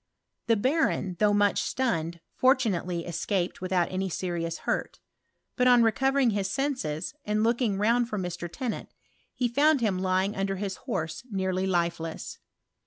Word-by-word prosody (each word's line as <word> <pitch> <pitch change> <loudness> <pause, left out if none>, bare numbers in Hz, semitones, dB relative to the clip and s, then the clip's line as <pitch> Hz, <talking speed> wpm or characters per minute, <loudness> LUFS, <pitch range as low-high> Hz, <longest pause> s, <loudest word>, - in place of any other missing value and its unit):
The 230 - +4
barony 225 - +1
though 210 -1 +4
much 205 -1 +3
stunned, 170 -10 -1
fortunately 200 - +1
escaped 180 +2 -2
without 185 -2 0
Any 190 +1 -1
serious 170 -2 -3
hurt; - - -2 0.6
but 250 -1 +3
on 245 -1 +6
recovering 265 +2 +3
his 200 -2 -1
senses, 195 - -2
anf 210 +1 +1
loukin^ 230 -3 +1
round 230 +3 +2
for 210 - -3
Mr. 175 -2 -4
Tcnnant, 225 +7 -4 0.5
he 250 -2 +1
found 285 +5 +3
him 205 -6 0
lying 190 +2 +1
undiThis 195 0 -2
horse 165 +7 -4
nearly 190 -2 -1
lifeless. 170 -3 -2
195 Hz, 140 wpm, -27 LUFS, 180-235 Hz, 0.6 s, on